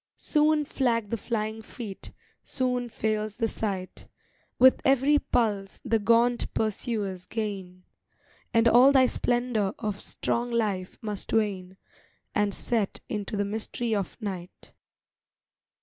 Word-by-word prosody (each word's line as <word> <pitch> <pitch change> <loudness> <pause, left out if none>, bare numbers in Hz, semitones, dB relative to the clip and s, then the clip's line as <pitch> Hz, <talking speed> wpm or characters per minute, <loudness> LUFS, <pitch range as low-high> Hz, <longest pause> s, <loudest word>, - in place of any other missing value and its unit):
Soon 300 -1 +2
flag 235 -7 0
the - - +1
flying 220 -1 -3
feet, 215 -3 -7 0.3
soon 250 -2 -1
fails 215 -1 -2
the 230 0 0
sight, 195 -5 -4 0.5
With 260 +1 +6
every 275 +2 +4
pulse 205 -7 -1
the 225 -2 +2
gaunt 235 +3 +3
pursuers 205 -4 -2
gain; 195 -5 -5 0.7
And 230 -1 +4
all 245 +4 +7
thy 265 -2 +6
splendor 240 -5 0
of 210 -2 -3
strong 240 +1 -1
life 210 -6 -1
must 210 -2 -4
wane 190 -4 -1 0.6
And 210 -1 +1
set 215 0 -1
into 210 -2 -3
the 205 - +1
mystery 220 +2 -2
of 200 +1 -3
night. 190 -5 -7
220 Hz, 120 wpm, -27 LUFS, 200-240 Hz, 0.7 s, all